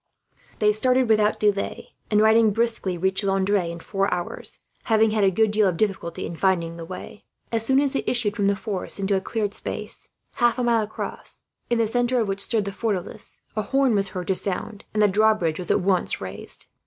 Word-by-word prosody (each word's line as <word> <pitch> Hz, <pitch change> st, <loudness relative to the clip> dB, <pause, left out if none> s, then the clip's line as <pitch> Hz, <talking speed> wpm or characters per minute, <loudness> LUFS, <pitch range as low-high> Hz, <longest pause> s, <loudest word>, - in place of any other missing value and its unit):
They 210 Hz, -1 st, +4 dB
started 250 Hz, +4 st, +2 dB
without 215 Hz, -1 st, +3 dB
delay 205 Hz, -1 st, -1 dB, 0.2 s
and, 210 Hz, -1 st, +4 dB
riding 220 Hz, +1 st, +5 dB
briskly, 225 Hz, -4 st, 0 dB
reached 190 Hz, +3 st, +1 dB
Landres 195 Hz, -2 st, +1 dB
in 170 Hz, -, -7 dB
four 195 Hz, +3 st, -1 dB
hours; 175 Hz, -1 st, -4 dB, 0.3 s
having 220 Hz, -1 st, +3 dB
had 215 Hz, -1 st, +1 dB
a 195 Hz, -, +6 dB
good 215 Hz, +3 st, +2 dB
deal 210 Hz, -1 st, +4 dB
of 180 Hz, -3 st, -1 dB
difficulty 190 Hz, -5 st, -1 dB
in 170 Hz, -, -6 dB
finding 170 Hz, -2 st, +1 dB
the 165 Hz, -1 st, -7 dB
way. 185 Hz, +3 st, -9 dB, 0.3 s
As 225 Hz, -1 st, +1 dB
soon 265 Hz, +3 st, +3 dB
as 280 Hz, -1 st, +1 dB
they 275 Hz, -, -1 dB
issued 220 Hz, -5 st, 0 dB
from 200 Hz, -3 st, +1 dB
the 200 Hz, -, +3 dB
forests 200 Hz, -3 st, -3 dB
into 195 Hz, 0 st, 0 dB
a 190 Hz, -, 0 dB
cleared 205 Hz, 0 st, -2 dB
space, -, -, -4 dB, 0.3 s
half 240 Hz, -2 st, +3 dB
a 250 Hz, -, 0 dB
mile 235 Hz, -2 st, +3 dB
across, 215 Hz, 0 st, -6 dB, 0.2 s
in 240 Hz, -, +2 dB
the 230 Hz, -, +3 dB
centre 245 Hz, +3 st, +1 dB
of 220 Hz, -, 0 dB
which 195 Hz, 0 st, -2 dB
stood 220 Hz, -1 st, +1 dB
the 200 Hz, -, -3 dB
fortalice, 200 Hz, -3 st, -4 dB
a 215 Hz, -, +1 dB
horn 265 Hz, +3 st, +2 dB
was 200 Hz, -1 st, +2 dB
heard 180 Hz, -2 st, -5 dB
to -, -, +4 dB
sound, 200 Hz, +3 st, -3 dB
and 215 Hz, 0 st, +2 dB
the -, -, +6 dB
drawbridge 205 Hz, -5 st, +2 dB
was 180 Hz, -, -6 dB
at -, -, +3 dB
once 185 Hz, -1 st, +1 dB
raised. 95 Hz, 0 st, -4 dB
210 Hz, 215 wpm, -24 LUFS, 190-225 Hz, 0.3 s, a